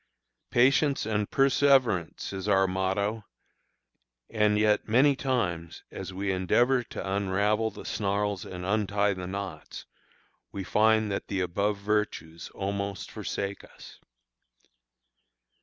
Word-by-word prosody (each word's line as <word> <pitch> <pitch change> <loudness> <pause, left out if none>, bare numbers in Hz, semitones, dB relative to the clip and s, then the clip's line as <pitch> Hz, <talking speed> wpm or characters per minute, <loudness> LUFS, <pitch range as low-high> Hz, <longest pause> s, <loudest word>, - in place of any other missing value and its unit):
"Patience 135 +2 +3
and 105 -2 -1
perseverance" 135 - +2
is 95 +1 -5
our 95 -1 +4
motto; 95 +3 -1 1.1
and 105 -1 +2
yet 105 0 +2
many 135 +6 +4
times, 95 -12 -2
as - - -6
we 95 +1 -2
endeavor 120 +8 +2
to 95 -4 -6
unravel 100 +3 +1
the - - -11
snarls 100 -1 -1
and 90 -1 -7
untie 105 0 +1
the 90 -1 -6
knots, 95 -4 -6 0.7
we 100 - -5
find 110 +2 +3
that 100 - -3
the 100 - -2
above 100 +4 0
virtues 100 -6 -2
almost 100 0 -4
forsake 100 0 -4
us. - - -14
100 Hz, 115 wpm, -28 LUFS, 95-110 Hz, 1.1 s, our